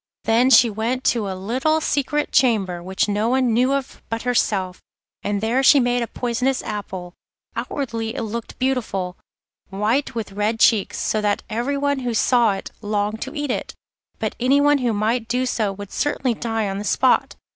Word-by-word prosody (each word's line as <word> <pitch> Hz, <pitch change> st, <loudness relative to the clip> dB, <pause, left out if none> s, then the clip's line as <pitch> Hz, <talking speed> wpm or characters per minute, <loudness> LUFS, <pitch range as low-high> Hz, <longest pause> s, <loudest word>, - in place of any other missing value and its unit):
Then 235 Hz, +3 st, +3 dB
she 255 Hz, -2 st, +7 dB
went 230 Hz, +4 st, -2 dB
to 225 Hz, -4 st, -2 dB
a 190 Hz, -, -3 dB
little 260 Hz, +11 st, 0 dB
secret 295 Hz, -1 st, -1 dB
chamber, 195 Hz, -9 st, +2 dB
which 190 Hz, +4 st, -1 dB
no 210 Hz, +2 st, 0 dB
one 255 Hz, -2 st, +2 dB
knew 250 Hz, +4 st, +3 dB
of 275 Hz, -2 st, -4 dB
but 225 Hz, 0 st, -3 dB
herself, 200 Hz, -7 st, 0 dB, 0.4 s
and 205 Hz, -1 st, -2 dB
there 235 Hz, +4 st, +1 dB
she 275 Hz, +1 st, +7 dB
made 245 Hz, -1 st, +1 dB
a 235 Hz, -, -2 dB
poisonous 250 Hz, +3 st, -1 dB
apple. 190 Hz, -4 st, -6 dB, 0.4 s
Outwardly 230 Hz, -2 st, -3 dB
it 245 Hz, -, -3 dB
looked 225 Hz, +1 st, -6 dB
beautiful, 220 Hz, -9 st, -1 dB, 0.5 s
white 215 Hz, +8 st, 0 dB
with 225 Hz, -3 st, -4 dB
red 210 Hz, +3 st, -1 dB
cheeks, 215 Hz, -4 st, +3 dB
so 215 Hz, -, 0 dB
that 205 Hz, -1 st, 0 dB
everyone 280 Hz, +5 st, 0 dB
who 245 Hz, -3 st, -2 dB
saw 235 Hz, -2 st, +3 dB
it 195 Hz, -, -7 dB
longed 210 Hz, +1 st, -2 dB
to 265 Hz, -, -5 dB
eat 290 Hz, -3 st, -2 dB
it, -, -, -4 dB, 0.4 s
but -, -, -2 dB
anyone 285 Hz, +3 st, +4 dB
who 245 Hz, -2 st, +1 dB
might 220 Hz, +2 st, 0 dB
do 250 Hz, +2 st, 0 dB
so 220 Hz, -5 st, 0 dB
would 200 Hz, 0 st, -9 dB
certainly 265 Hz, -4 st, 0 dB
die 225 Hz, -1 st, -2 dB
on 195 Hz, 0 st, -3 dB
the -, -, -4 dB
spot. 255 Hz, +4 st, +2 dB
230 Hz, 180 wpm, -22 LUFS, 210-255 Hz, 0.5 s, she